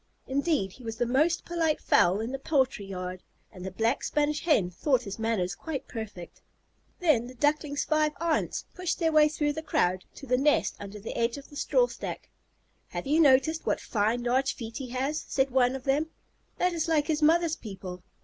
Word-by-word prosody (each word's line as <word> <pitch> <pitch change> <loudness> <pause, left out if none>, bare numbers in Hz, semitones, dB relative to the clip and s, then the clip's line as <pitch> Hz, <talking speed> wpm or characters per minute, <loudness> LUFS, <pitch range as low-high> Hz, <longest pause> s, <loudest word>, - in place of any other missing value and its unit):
Indeed, 280 - 0
he 250 - -15
was 225 -1 -4
the 240 +1 0
most 295 +8 +2
polite 330 -3 0
fowl 185 +4 +3
in 230 +3 -3
the 270 - -4
poultry 265 -7 +1
yard, 185 -1 -5 0.3
and 185 -4 -10
the 190 - -3
Black 225 +7 0
Spanish 295 0 0
Hen 210 - +3
thought 255 - +1
his 200 0 -7
manners 220 -5 0
quite 315 -5 -5
perfect. 210 -7 -8 0.6
Then 300 -10 +3
the 255 - -11
Duckling's 290 +1 +1
five 305 -1 +2
aunts 335 -1 0
pushed 365 -2 -2
their 325 -2 +1
way 305 -1 +6
through 295 -1 0
the 315 - -4
crowd 185 - 0
to 275 - -10
the 250 -1 +2
nest 295 +2 +2
under 205 +1 -8
the 215 - -6
edge 235 +1 0
of 280 - -12
the - - -12
strawstack. - - -1 0.6
"Have - - -5
you 300 +4 +2
noticed 300 +2 +4
what - - +1
fine 225 +2 0
large 260 +3 +1
feet 230 -1 -7
he 265 - -5
has?" 270 +5 -2
said 265 -1 +1
one 250 0 +3
of 265 - -6
them. 285 +4 +1 0.5
"That 360 0 +1
is 330 -1 -1
like 310 -3 +2
his 310 -1 0
mother's 325 +1 +4
people. 190 - -8
270 Hz, 195 wpm, -28 LUFS, 225-305 Hz, 0.6 s, way